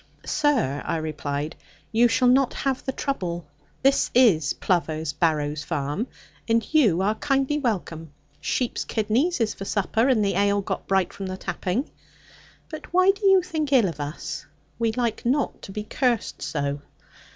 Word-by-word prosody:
'Sir,' 260 - +1
I - - -1
replied, 150 -1 -3 0.4
'you 235 +2 +5
shall 250 +2 +2
not 260 +1 +4
have 270 -2 -1
the 265 - -2
trouble. 180 - -3 0.4
This 275 +1 +3
is 185 - +5
Plover's 160 -4 -1
Barrows 150 -2 0
farm, 150 - -2 0.4
and 230 0 +2
you 210 - +4
are 210 +2 +2
kindly 275 +3 0
welcome. 170 - -3 0.3
Sheep's 240 - -1
kidneys 240 +11 0
is 220 -2 +1
for - - -8
supper, 220 +4 +1
and 230 -6 +3
the 195 - +1
ale 200 +1 +2
got - - -4
bright 190 -2 +1
from 195 - -6
the 185 0 -4
tapping. 205 - -2 0.8
But 310 - -9
why 370 +2 +5
do 400 0 -1
you 385 -2 +6
think 315 -5 -3
ill 245 -7 +5
of 160 -4 -6
us? 145 +2 -5 0.3
We 230 -1 +2
like 235 -2 -1
not 270 +4 0
to - - -9
be 210 +2 -4
cursed 240 +1 -1
so.' 140 -1 -2
215 Hz, 160 wpm, -24 LUFS, 165-265 Hz, 0.8 s, you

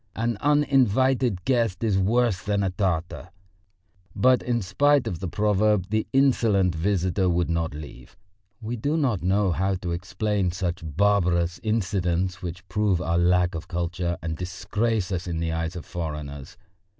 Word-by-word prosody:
An 115 +1 -1
uninvited 130 -5 +2
guest 115 -7 +1
is 110 -4 +1
worse 110 0 +2
than 100 0 0
a 95 - 0
Tartar. 90 -2 -2 0.9
But 130 0 +4
in 120 -3 -1
spite 140 +8 +3
of 95 -8 -4
the 95 - -4
proverb 105 0 +1
the 110 0 0
insolent 115 -9 +3
visitor 95 +2 0
would 85 -1 0
not 80 -2 -1
leave. 75 +3 -11 0.5
We 115 +3 -3
do 145 +8 -1
not 125 - 0
know 95 +1 +2
how 95 +3 0
to 90 -1 -4
explain 95 +2 -1
such 90 0 -3
barbarous 90 0 +1
incidents 95 -5 -1
which 90 +1 -7
prove 100 -1 +1
our 85 -1 0
lack 90 0 +3
of 80 +2 -6
culture 85 0 -2
and 80 0 -3
disgrace 100 +4 -2
us 90 -1 -3
in 85 -2 -3
the 80 0 -1
eyes 80 +2 -3
of 85 - -7
foreigners. 75 -4 -6
95 Hz, 155 wpm, -25 LUFS, 85-110 Hz, 0.9 s, But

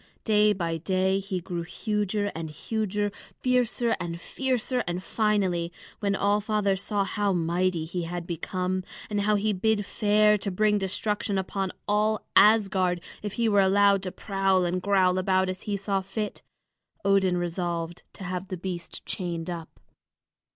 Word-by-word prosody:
Day 210 -1 +4
by 170 -4 -1
day 190 +3 +1
he 195 -1 -3
grew 175 0 -4
huger 205 +3 -1
and 160 -1 -5
huger, 205 +5 -2 0.3
fiercer 245 -2 +2
and 170 0 -4
fiercer, 255 +2 -1
and 175 +1 -2
finally, 190 -7 +1 0.3
when 200 -1 0
All 205 +1 +2
Father 210 -2 +1
saw 200 +1 -1
how 205 0 0
mighty 175 0 0
he 175 +2 -3
had 170 0 -4
become, 185 +2 -2 0.3
and 205 -1 +1
how 210 +1 +3
he 210 +1 +1
bid 205 +2 +1
fair 210 +1 +3
to 200 - -2
bring 210 +2 +2
destruction 205 +1 -1
upon 190 0 -2 0.2
all 210 +1 +1
Asgard 195 -4 +5 0.2
if 205 -2 -4
he 235 -1 +1
were 205 -2 +4
allowed 200 0 +4
to 185 -1 -4
prowl 195 -2 +1
and 180 +1 -1
growl 185 -2 +3
about 185 0 +2
as 185 0 -4
he 200 - 0
saw 195 0 -1
fit, 200 +2 -4 0.6
Odin 195 -2 +3
resolved 175 -1 -3
to - - -10
have 185 +1 -4
the 185 -2 -4
beast 175 -1 -5
chained 175 -2 -3
up. 165 -2 -8
195 Hz, 160 wpm, -27 LUFS, 180-210 Hz, 0.6 s, Asgard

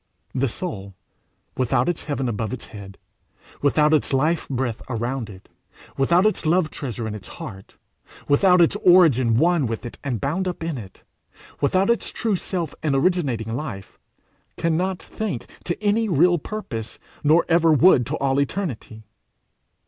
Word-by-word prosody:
The 135 +1 +1
soul, 100 - -6 0.6
without 125 0 +1
its 175 -2 -2
heaven 135 -3 -2
above 115 0 -3
its 130 - -6
head, 100 -2 -11 0.6
without 150 +2 +3
its 150 - +2
life 155 +5 +1
breath 125 -4 -2
around 120 0 -3
it, 95 -2 -13 0.5
without 170 +8 +3
its 215 - +1
love 160 0 +2
treasure 120 -5 -5
in 110 - -4
its 100 -4 -8
heart, 95 0 -10 0.5
without 180 +5 +5
its 170 - +4
origin 145 -11 +5
one 165 -1 +3
with 115 +1 -5
it 120 - -8
and 125 -6 -2
bound 165 - -1
up 175 -2 -4
in 165 -5 -3
it, 95 -4 -12 0.6
without 185 +9 +2
its 235 - -1
true 220 -4 -1
self 175 -4 -3
and 150 -3 0
originating 135 - 0
life, 115 -9 -7 0.6
cannot 175 +3 0
think 210 - -5 0.2
to 175 - -2
any 215 +2 +2
real 175 +1 +4
purpose 115 - -6 0.3
nor 155 +3 +4
ever 165 -1 +4
would 150 -5 +5
to - - -2
all 135 0 +1
eternity. 135 - -4
145 Hz, 155 wpm, -23 LUFS, 120-175 Hz, 0.6 s, without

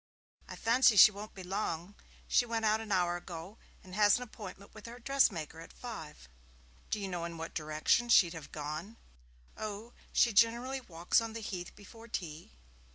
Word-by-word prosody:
'I - - -6
fancy 235 0 +4
she 215 - +10
won't 210 +1 -9
be 190 - -8
long. 180 -1 -3 0.3
She - - +4
went 230 -2 -2
out 215 +1 +3
an 220 -2 -7
hour 175 -2 +2
ago, 175 +3 -9 0.2
and 185 - -13
she - - -5
has 205 -1 +6
an 250 - -5
appointment 210 -4 -10
with 220 +1 -11
her 235 +1 -9
dressmaker 225 - +1
at 165 - -11
five.' 160 - -9 0.6
'Do 215 - -1
you 200 - -3
know 175 -2 -4
in 170 0 -5
what 165 0 -6
direction 155 +10 +1
she'd 180 -7 +6
have 165 -3 -9
gone?' 155 +9 -6 0.6
'Oh, 215 +2 -6 0.2
she 235 - +4
generally 240 +5 +3
walks 175 -2 +1
on 225 -1 -5
the 230 - -5
Heath 190 -5 -6
before 225 +3 -13
tea.' 165 -7 -6
205 Hz, 185 wpm, -32 LUFS, 170-230 Hz, 0.6 s, she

